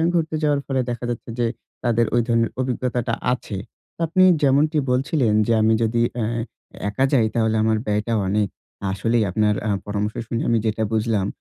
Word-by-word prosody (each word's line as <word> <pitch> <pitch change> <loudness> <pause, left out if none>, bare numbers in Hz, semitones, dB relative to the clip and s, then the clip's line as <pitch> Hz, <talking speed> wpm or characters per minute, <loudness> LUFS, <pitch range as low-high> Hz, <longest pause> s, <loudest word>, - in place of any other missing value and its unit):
ঘুরতে 160 -2 0
যাওয়ার 145 -1 +2
ফলে 135 -2 0
দেখা 120 0 -4
যাচ্ছে 120 0 -5
যে, 120 - +2 0.4
তাদের 120 -1 +2
ওই 120 - +4
ধরনের 115 -1 +2
অভিজ্ঞতাটা 125 -2 -1 0.2
আছে। 110 -5 -5 0.4
তো - - -53
আপনি 185 +4 +3 0.2
যেমনটি 145 +3 +3
বলছিলেন 130 -2 +1
যে 115 - +3
আমি 110 +1 +4
যদি 115 +1 +1 0.2
এ্যা 115 - 0 0.6
একা 130 +6 +1
যাই 120 -5 +4
তাহলে 110 -1 +2
আমার 110 0 +2
ব্যয়টা 105 +3 0
অনেক। 105 +1 +1 0.4
আসলেই 115 +4 +1
আপনার 105 +2 +2
আ - - 0 0.2
পরামর্শ 105 +1 -2
শুনে 115 0 -2
আমি 115 - +3
যেটা 110 0 0
বুঝলাম। 110 -3 +1
115 Hz, 175 wpm, -22 LUFS, 110-130 Hz, 0.6 s, ওই